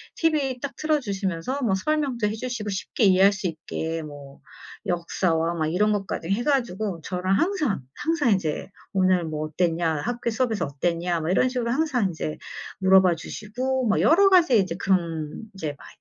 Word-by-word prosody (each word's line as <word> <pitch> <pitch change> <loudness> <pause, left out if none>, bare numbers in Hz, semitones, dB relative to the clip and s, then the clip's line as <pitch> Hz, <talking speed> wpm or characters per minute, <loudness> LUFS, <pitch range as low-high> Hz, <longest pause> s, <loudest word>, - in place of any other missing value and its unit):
TV 285 -6 0
딱 280 - -5
틀어 310 -1 +1
주시면서 200 +3 -3
뭐 205 -5 +2
설명도 265 -2 0
해 210 - -2
주시고 225 -2 -4
쉽게 200 +3 -1
이해할 190 +1 +6
수 195 -2 -3
있게 160 0 -4
뭐 145 -2 -11 0.4
역사와 170 -1 0
막 155 -2 0
이런 210 +6 +2
것까지 195 -4 -3
해 215 +5 +1
가지고 215 - 0
저랑 185 +1 0
항상 315 - 0
항상 300 -7 +1
이제 180 -3 -1 0.2
"오늘 185 -2 +3
뭐 155 -1 -3
어땠냐. 165 -1 0
학교 240 0 -2
수업에서 225 -4 0
어땠냐." 170 +4 -1
뭐 160 - -2
이런 255 +7 +3
식으로 240 -2 -2
항상 255 -8 +1
이제 155 -1 -4 0.4
물어봐 190 -2 +5
주시고 250 +8 -3
뭐 210 - +2
여러 390 +5 +6
가지 340 - +5
이제 185 -3 -1
그런 170 -2 -1
이제 155 -6 -4
막 - - -14
195 Hz, 335 characters per minute, -25 LUFS, 170-250 Hz, 0.4 s, 이해할